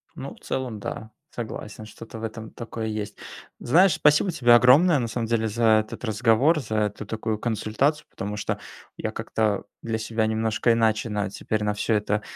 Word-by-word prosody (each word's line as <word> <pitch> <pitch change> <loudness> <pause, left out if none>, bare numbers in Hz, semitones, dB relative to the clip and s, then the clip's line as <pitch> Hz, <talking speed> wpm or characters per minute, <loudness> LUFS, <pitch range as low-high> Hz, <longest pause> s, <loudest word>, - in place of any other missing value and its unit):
Ну, - - -7
в - - -21
целом 125 -5 -3
да, 110 +2 -6 0.2
согласен, 110 -2 -7
что-то 115 +1 -10
в - - -9
этом 110 0 -6
такое 115 -1 -6
есть. 105 -1 -4 0.4
Знаешь, 175 +7 +4
спасибо 155 +4 +3
тебе 120 -7 +4
огромное 140 +7 +6
на 120 - -1
самом 115 +1 -3
деле 110 -1 +1
за 115 +3 -2 0.2
этот - - -10
разговор, 115 +8 +3
за 110 -5 -4
эту 105 +1 -2
такую 110 -1 -3
консультацию, 120 +7 0
потому 105 +1 -5
что 105 - -2 0.4
я - - -3
как-то 110 -3 -1 0.2
для 115 -1 -2
себя 110 0 -1
немножко 110 +1 +1
иначе 110 0 +1
на 105 -1 -1
теперь 110 +1 -2
на 105 0 0
всё 110 +1 0
это 105 0 0
110 Hz, 180 wpm, -25 LUFS, 110-120 Hz, 0.4 s, огромное